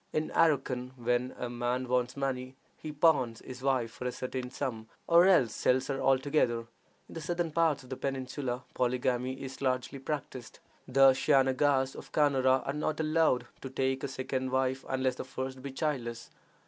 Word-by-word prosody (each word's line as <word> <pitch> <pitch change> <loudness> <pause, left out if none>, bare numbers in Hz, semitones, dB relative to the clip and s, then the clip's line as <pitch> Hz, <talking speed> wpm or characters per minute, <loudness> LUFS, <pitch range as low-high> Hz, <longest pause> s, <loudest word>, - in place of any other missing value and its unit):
In 155 0 -1
Arracan, 130 -5 +1
when 125 +1 -1
a 125 - -3
man 120 +1 -2
wants 125 +1 0
money, 130 -1 -3 0.2
he 155 - -7
pawns 145 -7 +2
his 125 0 -8
wife 130 -4 +1
for 125 - -8
a - - -1
certain 130 0 -4
sum, 115 -5 -4 0.2
or 170 +2 +6
else 155 -12 +4
sells 130 +1 +2
her 135 -1 -2
altogether. 135 -3 +2 0.5
In - - -13
the 165 - -6
southern 170 0 -2
parts 155 -3 +2
of 130 - -15
the - - -2
peninsula 130 -1 -3
polygamy 125 +1 0
is 135 0 -8
largely 130 +1 -1
practiced. 135 -3 -5 0.3
The 135 +1 +6
Shaynagas 135 0 +2
of - - -10
Canara 135 -3 +3
are 140 - -2
not 150 +1 -2
allowed 155 -4 +2 0.2
to 135 - -6
take 130 0 -1
a - - 0
second 130 0 -3
wife 130 0 0
unless 130 -1 0
the - - -4
first 130 0 -6
be 140 +1 -6
childless. 130 -6 -3
130 Hz, 175 wpm, -30 LUFS, 125-140 Hz, 0.5 s, or